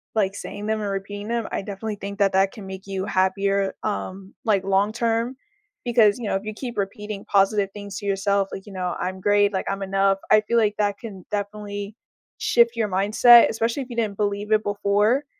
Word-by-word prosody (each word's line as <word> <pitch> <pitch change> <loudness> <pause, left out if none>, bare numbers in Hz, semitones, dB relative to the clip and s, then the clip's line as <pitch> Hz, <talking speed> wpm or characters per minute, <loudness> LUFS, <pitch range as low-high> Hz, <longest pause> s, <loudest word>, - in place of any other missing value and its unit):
like, 195 -2 +1
saying 205 0 -7
them 220 0 0
or 205 - -2
repeating 205 +1 -5
them, 235 -1 -1
I - - -2
definitely 205 +2 -5
think 200 +1 -7
that 195 -2 +3
that 195 0 +3
can 205 -3 -10
make 190 +1 -8
you 190 -1 -3
happier, 195 +1 +1
um, 185 - -4
like, 205 -4 +2
long-term 225 +5 0 0.5
because, 225 -4 +4
you 230 - -4
know, - - 0
if 195 - -2
you 215 - -4
keep 240 0 -7
repeating 205 0 -4
positive 195 0 +2
things 200 -2 -7
to 205 - -9
yourself, 200 0 +1
like, 195 - -7
you 205 - -11
know, 180 -2 -2
"I'm 185 0 -4
great," 205 0 +3
like, 190 - -1
"I'm 195 0 -3
enough," 195 0 +2
I 215 - +7
feel 235 +2 0
like 215 -2 +2
that 205 -1 0
can 200 -6 -9
definitely 205 0 -4 0.4
shift 235 0 +3
your 225 -2 0
mindset, 215 +5 +6
especially 230 +5 -1
if 255 - -14
you 240 - -7
didn't 215 -4 -1
believe 205 0 -2
it 215 0 +4
before. 205 +6 +1
205 Hz, 205 wpm, -23 LUFS, 195-215 Hz, 0.5 s, I